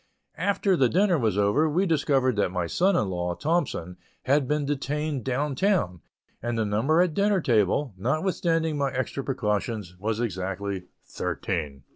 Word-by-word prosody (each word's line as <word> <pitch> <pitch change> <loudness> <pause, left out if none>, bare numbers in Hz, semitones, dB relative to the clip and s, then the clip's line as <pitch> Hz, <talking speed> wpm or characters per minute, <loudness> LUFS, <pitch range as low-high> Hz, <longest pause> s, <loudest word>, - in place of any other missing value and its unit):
After 195 +1 +2
the 130 -7 +3
dinner 185 -2 +3
was 110 -5 +1
over, 105 +11 +3
we 180 +6 +1
discovered 140 - +2
that 100 - +2
my 90 -1 -2
son 185 - +2
in 105 - +1
law, 90 -1 -2
Thompson, 145 - -1 0.3
had 140 0 +2
been 150 0 0
detained 145 -1 -2
down 135 +4 -1
town, 135 - +1 0.4
and 120 0 -2
the 110 - +1
number 130 +12 +3
at 175 -4 -1
dinner 200 +1 +2
table, 115 - +1
notwithstanding 160 - 0
my 140 -1 +1
extra 130 +1 -3
precautions, 105 -6 -2
was 110 +2 -2
exactly 95 -3 -3 0.2
thirteen. 70 -3 -3
130 Hz, 155 wpm, -26 LUFS, 100-155 Hz, 0.4 s, the